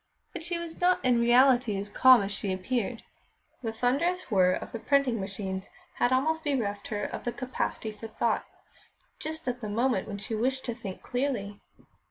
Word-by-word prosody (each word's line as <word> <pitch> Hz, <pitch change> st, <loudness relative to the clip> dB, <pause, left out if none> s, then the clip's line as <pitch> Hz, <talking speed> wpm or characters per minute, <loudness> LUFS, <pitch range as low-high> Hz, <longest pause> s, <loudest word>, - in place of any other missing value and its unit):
But -, -, -5 dB
she 345 Hz, +1 st, -2 dB
was 340 Hz, 0 st, -6 dB
not 360 Hz, -5 st, +3 dB
in 245 Hz, -2 st, +4 dB
reality 245 Hz, -2 st, +5 dB
as 200 Hz, +1 st, -4 dB
calm 255 Hz, +2 st, +6 dB
as 195 Hz, -, -3 dB
she 200 Hz, 0 st, -2 dB
appeared. 225 Hz, +4 st, -2 dB, 0.6 s
The 225 Hz, -3 st, -2 dB
thunderous 275 Hz, +8 st, 0 dB
whirr 185 Hz, -2 st, +5 dB
of -, -, -5 dB
the 230 Hz, -, -5 dB
printing 275 Hz, -3 st, +2 dB
machines 190 Hz, -1 st, -4 dB, 0.3 s
had 245 Hz, -, +2 dB
almost 315 Hz, +5 st, +2 dB
bereft 220 Hz, -9 st, -1 dB
her 205 Hz, -1 st, -3 dB
of -, -, -4 dB
the 240 Hz, -, -1 dB
capacity 250 Hz, -3 st, -3 dB
for 215 Hz, +1 st, -9 dB
thought, 220 Hz, 0 st, 0 dB, 0.8 s
just 315 Hz, -1 st, -5 dB
at 250 Hz, 0 st, -2 dB
the 215 Hz, -, -4 dB
moment 235 Hz, -1 st, +1 dB
when 205 Hz, -, -5 dB
she 205 Hz, +3 st, -6 dB
wished 260 Hz, +4 st, 0 dB
to 240 Hz, -, -2 dB
think 210 Hz, -5 st, -8 dB
clearly. 245 Hz, -6 st, -2 dB
240 Hz, 185 wpm, -28 LUFS, 205-265 Hz, 0.8 s, calm